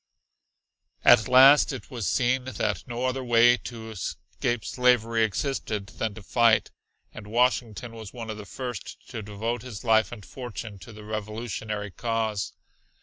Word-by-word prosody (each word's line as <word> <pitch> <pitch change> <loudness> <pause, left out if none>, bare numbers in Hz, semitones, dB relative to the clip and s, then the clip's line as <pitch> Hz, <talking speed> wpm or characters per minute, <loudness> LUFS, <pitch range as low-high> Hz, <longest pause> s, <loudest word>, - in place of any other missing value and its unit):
At 110 0 +7
last 135 +4 +7
it 130 -7 -8
was 120 -6 -3
seen 125 +1 +1
that 130 -5 -2
no 120 +1 -3
other 130 +1 -1
way 120 0 +6
to 115 -3 -8
escape 110 +3 -3
slavery 115 -3 +2
existed 110 -2 -2
than 110 -2 -3
to 110 - -10
fight. 115 +1 +3 0.4
And 105 - -10
Washington 120 0 0
was 110 -3 -9
one 115 -3 -6
of 110 - -6
the 105 -1 -9
first 120 -2 -7
to 110 - -5
devote 110 +4 -3
his 125 -5 -8
life 110 -3 +3
and 105 -5 -9
fortune 115 -3 -7
to 95 +6 -12
the 105 -1 -11
Revolutionary 105 -1 -4
cause. 110 -2 -2
115 Hz, 150 wpm, -26 LUFS, 105-125 Hz, 0.4 s, At